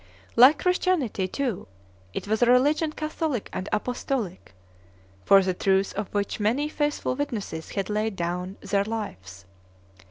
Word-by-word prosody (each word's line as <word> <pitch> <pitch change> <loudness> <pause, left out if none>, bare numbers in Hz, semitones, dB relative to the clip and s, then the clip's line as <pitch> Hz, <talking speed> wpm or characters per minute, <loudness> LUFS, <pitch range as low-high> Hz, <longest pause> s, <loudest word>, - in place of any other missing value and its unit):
Like 255 +6 +8
Christianity, 350 - +1
too, 250 -1 -3 0.4
it - - -5
was 220 +2 0
a 245 - +5
religion 290 +6 +3
catholic 310 -5 -3
and 185 - -4
apostolic, 215 - -3 0.7
for 195 -1 +7
the 185 0 0
truth 190 +1 +1
of 210 -1 -4
which 205 +1 -2
many 235 +8 +1
faithful 295 -3 -1
witnesses 215 - -4
had 195 -1 -2
laid 215 0 -1
down 180 +2 -3
their 200 0 +1
lives. 100 - -6
215 Hz, 135 wpm, -26 LUFS, 190-275 Hz, 0.7 s, Like